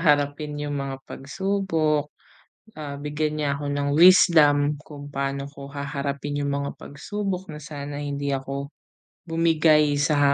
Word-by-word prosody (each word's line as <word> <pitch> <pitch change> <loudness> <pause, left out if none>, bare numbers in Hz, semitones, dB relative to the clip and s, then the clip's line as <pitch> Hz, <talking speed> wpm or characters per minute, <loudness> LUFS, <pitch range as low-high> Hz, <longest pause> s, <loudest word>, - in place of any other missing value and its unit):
harapin 145 -1 +1
'yong 145 0 -3
mga 135 -1 -3
pagsubok. 160 -2 -1 0.7
Ah, 145 -2 -5
bigyan 150 +1 -1
Niya 145 - +1
ako 145 - -5
ng 145 0 -1
wisdom 165 -5 +7 0.3
kung 145 -1 -9
paano 140 0 -3
ko 140 -1 -10
haharapin 140 0 -3
'yong 140 0 -1
mga 140 - -3
pagsubok 190 +5 -4
na 150 - -7
sana 145 -1 -6
hindi 140 -1 -3
ako 140 +1 -3 0.6
bumigay 160 -2 +4
sa 145 -1 +3
145 Hz, 135 wpm, -24 LUFS, 140-155 Hz, 0.7 s, wisdom